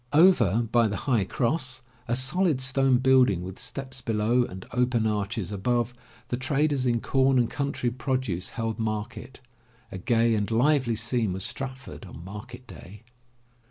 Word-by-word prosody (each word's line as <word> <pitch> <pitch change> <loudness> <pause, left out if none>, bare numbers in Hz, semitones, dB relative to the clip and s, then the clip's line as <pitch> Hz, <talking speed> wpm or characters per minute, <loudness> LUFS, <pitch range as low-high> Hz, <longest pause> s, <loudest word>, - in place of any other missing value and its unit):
Over 120 - +5
by 120 -2 +4
the 105 - -3
High 120 -8 +2
Cross, 130 - -1 0.2
a 120 - +1
solid 150 +3 +2
stone 135 0 +3
building 125 -8 +4
with 95 +1 -7
steps 130 -2 -5
below 115 +2 +1
and 95 -3 -9
open 125 -2 +1
arches 105 -2 -2
above, 120 +4 0 0.4
the 120 - -1
traders 135 0 0
in 120 -1 +1
com 135 0 +2
and 120 -2 +3
country 140 -2 -2
produce 130 -8 -2
held 115 -1 -4
market. 110 +4 -4 0.5
A 95 - -6
gay 115 +3 +2
and 105 -2 0
lively 125 +1 +2
scene 115 -3 0
was 95 +1 -1
Stratford 130 -4 -6
on 85 -1 -11
market 105 +6 -9
day. 105 -1 -12
120 Hz, 155 wpm, -26 LUFS, 110-130 Hz, 0.5 s, Over